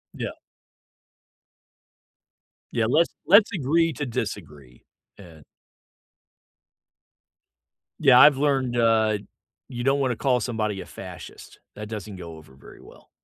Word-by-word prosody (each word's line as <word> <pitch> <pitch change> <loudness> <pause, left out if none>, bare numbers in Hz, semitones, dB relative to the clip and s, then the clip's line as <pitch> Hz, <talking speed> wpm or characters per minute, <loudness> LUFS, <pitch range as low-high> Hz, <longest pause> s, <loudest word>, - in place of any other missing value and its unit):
Yeah. - - -4 2.4
Yeah, 115 -2 0
let's 165 +6 +2
let's 205 +3 +6
agree 165 +1 +1
to 145 +3 -5
disagree, 70 - -7 0.3
an 85 -6 -15 2.6
Yeah, 135 -4 +6
I've 145 -2 +7
learned, 135 -4 0
uh, 110 -2 +2 0.5
you 120 -2 -6
don't 135 +2 +1
wanna 130 -3 0
call 125 +1 +1
somebody 110 -4 -3
a - - -9
fascist. - - -12 0.2
That 105 0 -8
doesn't 105 -2 -7
go 85 -3 -10
over 75 -4 -17
very 65 - -16
well. - - -18
120 Hz, 115 wpm, -24 LUFS, 100-135 Hz, 2.6 s, I've